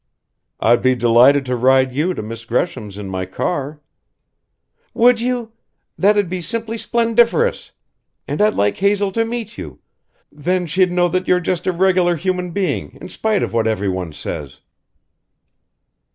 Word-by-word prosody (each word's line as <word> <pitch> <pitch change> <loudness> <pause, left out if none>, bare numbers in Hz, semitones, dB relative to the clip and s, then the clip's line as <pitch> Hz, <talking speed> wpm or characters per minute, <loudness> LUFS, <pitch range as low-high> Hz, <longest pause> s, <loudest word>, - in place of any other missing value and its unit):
"I'd 120 +2 +3
be 130 0 +3
delighted 125 +4 +4
to 125 0 -1
ride 130 +1 +3
you 165 +7 0
to - - -5
Miss 115 +1 -7
Gresham's 115 - -3
in 105 -1 -6
my 95 -1 -4
car 145 - -3 0.6
" - - -48
"Would 240 0 +4
you? 245 -2 -2 0.4
That'd 205 0 +3
be 180 +1 -4
simply 225 +6 -4
splendiferous! 235 - +1 0.6
And - - -2
I'd 215 0 +3
like 100 0 +1
Hazel 200 0 +1
to 225 +3 0
meet 225 -2 -5
you 75 -8 -8 0.5
then 180 +5 -1
she'd 180 +2 +1
know 175 0 +2
that 185 +1 -2
you're 180 - +3
just 180 0 -2
a - - +3
regular 180 -1 +2
human 180 +1 -2
being 185 +1 -3
in - - -9
spite 215 +3 -1
of - - -4
what 115 -1 +1
everyone 95 -5 -2
says." 75 -1 -7
175 Hz, 155 wpm, -19 LUFS, -, 0.6 s, delighted